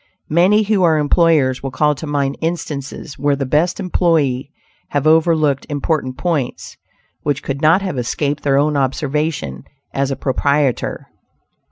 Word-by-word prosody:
Many 190 +7 +4
who 205 -2 +1
are 165 -3 +4
employers 150 -3 +2
will 135 - -3
call 150 +3 +1
to 155 +2 -7
mind 140 -1 -1
instances 150 -4 -4
where 145 +1 +2
the 140 0 -3
best 155 +8 +1
employees 160 -9 +1 0.4
have 145 -1 -1
overlooked 155 -3 +3
important 145 -3 -2
points 155 -8 -2 0.5
which 145 -1 -2
could 140 +1 -4
not 165 +5 +4
have 180 -9 -3
escaped 145 +4 -2
their 140 -1 +2
own 150 +1 +2
observation 140 - -2 0.3
as 140 0 0
a 135 - -1
proprietor. 140 0 0
145 Hz, 145 wpm, -18 LUFS, 135-160 Hz, 0.5 s, Many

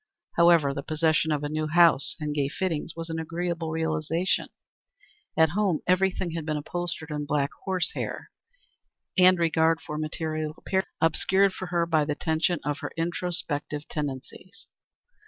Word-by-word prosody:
However, 170 -5 +5
the 140 - -4
possession 155 +1 +1
of 150 -1 0
a - - 0
new 155 +1 -2
house 165 -3 +4
and 150 -1 -2
gay 140 -2 0
fittings 165 -1 -2
was 165 0 -5
an 160 - -2
agreeable 165 0 -3
realization. 160 +2 0 0.9
At 160 0 +5
home 190 -4 +1
everything 185 -1 +1
had 165 -1 -4
been 155 0 -2
upholstered 165 0 -4
in 150 -1 -3
black 145 -1 +1
horse 185 -2 0
hair, - - -5 0.8
and 185 -1 +6
regard 165 -1 +2
for 150 -1 -6
material 155 0 -3
appearances 190 0 -1
had - - +4
been - - +8
obscured 190 +4 +2
for 185 - -6
her 175 -1 +1
by 160 -3 +2
the 150 0 -1
tension 160 +2 0
of 145 -1 -1
her - - -5
introspective 165 -4 -2
tendencies. 150 +8 -6
160 Hz, 160 wpm, -27 LUFS, 150-175 Hz, 0.9 s, been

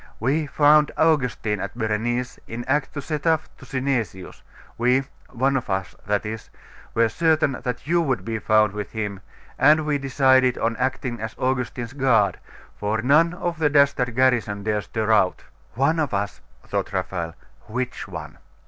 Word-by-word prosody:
We 145 +7 0
found 150 +2 +5
Augustine 125 -9 +1
at 100 +4 -5
Berenice, 120 +2 -1
in 120 +1 -6
act 145 +3 0
to 140 - -4
set 150 +2 -3
off 160 -1 +2
to 130 - -13
Synesius: 125 -8 -3 0.3
we 125 +3 +2 0.3
one 135 +3 +1
of 130 - -2
us, 95 0 -2
that 105 +1 0
is 110 0 -6 0.5
were 115 0 +4
certain 155 0 +1
that 125 0 -4
you 170 +3 +2
would 130 - -1
be 115 -1 -2
found 110 -2 +3
with 105 -1 -6
him; 105 -3 -4 0.4
and 155 +1 +5
we 150 -1 0
decided 130 -2 +3
on 115 0 0
acting 125 -1 -2
as 110 0 -5
Augustine's 125 -2 -2
guard, 115 -9 +2 0.4
for 110 +2 -2
none 165 +6 +4
of 175 -2 -3
the 150 -2 +3
dastard 140 -4 +3
garrison 120 -6 +2
dare 105 0 0
stir 110 +1 -2
out.' 95 -4 +2 0.3
'One 140 +6 +2
of 150 -8 0
us,' 100 +1 -3 0.2
thought - - -3
Raphael, 90 -3 -3 0.3
'which 125 +3 -4
one? - - -8
125 Hz, 165 wpm, -23 LUFS, 110-140 Hz, 0.5 s, found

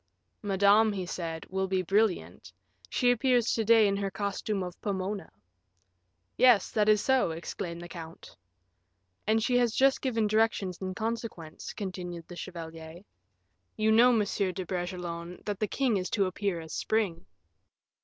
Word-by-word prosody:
"Madame," 205 +2 +4
he 190 -2 -3
said, 165 -2 -5
"will 190 0 0
be 185 -1 0
brilliant; 175 - 0 0.4
she 245 -1 +3
appears 245 -1 +2
to 225 - 0
day 225 -1 +6
in 200 - +1
her 200 0 -1
costume 200 0 -2
of 180 -1 -8
Pomona." 195 0 -3 1.1
"Yes, 245 -6 +5
that 215 -1 +2
is 210 -1 +5
so," 265 -7 +3
exclaimed 170 +1 -5
the - - -8
count. 165 -1 -10 0.9
"And 220 +1 +3
she 245 +1 +3
has 240 -2 +1
just 270 0 +3
given 230 -5 0
directions 210 -4 +1
in 185 -1 -4
consequence," 220 -8 -5
continued 180 -4 -6
the 175 - -9
chevalier. 165 -2 -8 0.8
"You 220 0 +2
know, 240 +3 +6
Monsieur 205 -4 +1
de 185 +1 -5
Bragelonne, 175 -1 -5
that 205 -2 -3
the 215 - 0
king 250 -2 +1
is 185 -1 -3
to 200 -3 +1
appear 185 -1 -2
as 160 -2 -9
Spring." 200 -6 -1
195 Hz, 155 wpm, -29 LUFS, 175-220 Hz, 1.1 s, day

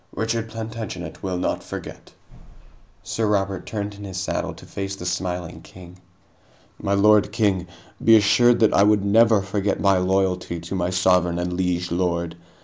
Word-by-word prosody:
Richard 115 0 -2
Plantagenet 110 -6 -6
will 95 -2 -3
not 90 - -1
forget." - - -9 0.9
Sir 110 -1 -2
Robert 95 -2 -1
turned 105 -1 -4
in 100 0 -11
his 95 -2 -6
saddle 95 - -3
to - - -14
face 95 0 -5
the 90 - -9
smiling 90 -2 -3
king. 90 +1 -14 0.8
"My 100 0 0
lord 105 +1 +4
king, 100 -5 0 0.4
be 115 - +7
assured 120 +3 +4
that 110 - +4
I - - +4
would 105 -1 +3
never 110 0 +4
forget 100 0 -1
my 100 -1 +3
loyalty 90 -2 0
to 85 +3 -8
my 90 -2 -1
sovereign 90 -2 +2
and 90 0 -2
liege 90 -1 -1
lord. 85 -1 -1
95 Hz, 160 wpm, -23 LUFS, 90-105 Hz, 0.9 s, be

